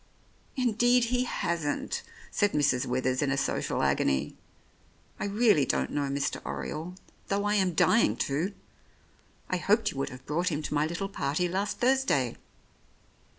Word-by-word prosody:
"Indeed 245 0 +3
he 250 0 +2
hasn't," 170 -10 -2 0.3
said 205 -1 +1
Mrs. 140 -4 +2
Withers 130 +1 0
in 145 - +1
a 135 - 0
social - - -1
agony. 70 +1 +1 0.8
"I - - -2
really 205 - +3
don't - - 0
know 145 -1 -1
Mr. 140 +1 -1
Oriole, 165 +4 -5 0.3
though 200 +1 0
I 205 - +2
am 190 -4 +2
dying 230 +6 +4
to. 160 +9 -1 0.9
I 185 - 0
hoped 210 +5 +2
you - - -10
would 135 - -1
have 125 0 -11
brought 170 +4 0
him 155 -2 -3
to - - -4
my 150 +1 +2
little 170 +4 -3
party 180 -2 -1
last 195 +3 -2
Thursday." 245 - +2
170 Hz, 150 wpm, -28 LUFS, 140-205 Hz, 0.9 s, dying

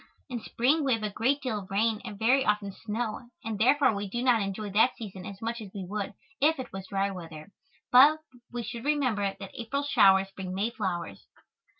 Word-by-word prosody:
In 245 -2 -3
spring 275 +9 +1
we 265 -2 +2
have 220 - -7
a 210 - -1
great 265 +8 0
deal 225 -5 -1
of 190 -1 -11
rain 215 +2 +1
and 215 -4 -7
very 250 +5 +3
often 210 -2 0
snow 225 +3 -4
and 220 -2 -4
therefore 260 +2 +4
we 200 -1 -4
do 240 +5 -2
not 245 -4 +4
enjoy 200 +1 -3
that 225 +5 +4
season 190 -4 -8
as 200 -1 -8
much 230 +1 -3
as 210 - -8
we 195 -2 -4
would 200 +1 -4 0.3
if 310 +2 +4
it 260 - -7
was 195 0 -6
dry 195 +1 0
weather, 165 -1 -9 0.4
but 280 +5 +8 0.3
we 240 -1 -4
should 230 +2 -6
remember 250 -10 +1
that 195 -1 -8
April 260 +5 -3
showers 195 -8 +5
bring 185 -1 -5
May 210 +4 0
flowers. 175 - -4
215 Hz, 210 wpm, -28 LUFS, 195-245 Hz, 0.4 s, but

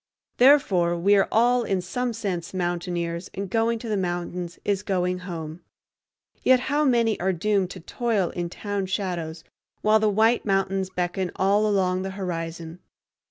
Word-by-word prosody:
Therefore 195 -11 +4
we 200 +4 +4
are 195 - +3
all, 245 +2 +4
in 195 -5 0
some 245 +7 -2
sense, 190 -6 -4
mountaineers, 175 -1 -2
and 200 +1 -3
going 230 0 +1
to 230 - -8
the 215 - 0
mountains 175 -1 -3
is 200 -1 +1
going 180 -3 -1
home. 160 0 -6 0.8
Yet 255 -1 +4
how 295 +1 +2
many 235 -5 +2
are 190 +2 +1
doomed 195 +1 0
to 185 - -9
toil 215 -2 -1
in 175 -1 -4
town 200 +1 -3
shadows 175 -4 -3 0.4
while 215 +1 +5
the 215 0 +2
white 220 +3 +3
mountains 195 -1 0
beckon 180 0 -2
all 200 +3 +2
along 185 -3 +1
the 190 - -3
horizon! 165 -2 -5
190 Hz, 160 wpm, -25 LUFS, 175-215 Hz, 0.8 s, while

